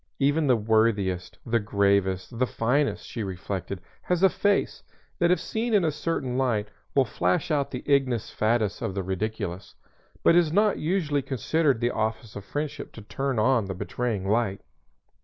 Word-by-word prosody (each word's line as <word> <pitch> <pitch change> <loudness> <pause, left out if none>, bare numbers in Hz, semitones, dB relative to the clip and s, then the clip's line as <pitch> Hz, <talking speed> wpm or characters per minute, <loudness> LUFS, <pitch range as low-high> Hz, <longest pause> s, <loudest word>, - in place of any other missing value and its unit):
Even 145 +2 +2
the 125 - +5
worthiest, 105 -4 +1
the 115 0 +2
gravest, 100 +1 +1
the 130 - +3
finest, 135 +6 0
she 115 - -5
reflected, 95 -1 -4 0.2
has 180 0 0
a 190 - +8
face, 200 +2 0 0.4
that 175 - +3
if 180 - +3
seen 225 0 -1
in 195 -4 +4
a 155 - +2
certain 140 -4 -2
light, 110 -5 0 0.3
will 135 -2 +5
flash 90 - 0
out 145 -2 +1
the 125 - -6
ignus 130 -5 +1
fatuus 110 -2 +1
of 95 - -3
the 95 - -1
ridiculous; 95 -1 -4 0.5
but 170 - +6
it - - +8
is 165 -3 +1
not 210 +4 +3
usually 155 -4 0
considered 135 +1 +1
the 120 +1 +1
office 110 0 -3
of 100 - -6
friendship 150 +6 -4
to 110 - -10
turn 135 +4 -2
on 115 0 +3
the 95 -1 -5
betraying 105 0 -2
light. 105 -2 +1
120 Hz, 175 wpm, -26 LUFS, 100-145 Hz, 0.5 s, a